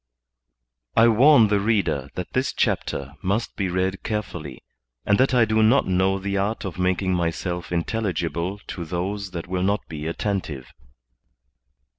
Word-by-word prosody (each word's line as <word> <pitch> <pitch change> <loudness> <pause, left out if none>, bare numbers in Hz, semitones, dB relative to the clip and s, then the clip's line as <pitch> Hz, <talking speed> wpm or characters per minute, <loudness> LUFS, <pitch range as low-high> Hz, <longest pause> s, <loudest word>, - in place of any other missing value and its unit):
I 115 +1 +6
WARN 115 0 +6
the 105 -1 +3
reader 95 - 0
that 90 - -5
this 130 +1 0
chapter 70 +1 -1
must 100 +5 -1
be 95 -2 -1
read 95 +1 -1
care 105 -1 -1
fully, 75 -9 -9 0.4
and 100 - +3
that 130 - +4
I 120 -2 +5
do 110 0 +2
not 115 +6 +4
know 95 +1 +2
the 100 +1 -2
art 105 +3 -1
of 90 -1 -6
making 95 +1 +1
myself 85 0 -2
intelligible 90 -1 -2
to 85 - -5
those 95 +4 -3
that 85 -2 -6
will 90 0 -2
not 100 +3 0
be 75 -1 -6
attentive. 85 -7 -3
95 Hz, 155 wpm, -23 LUFS, 85-105 Hz, 0.4 s, I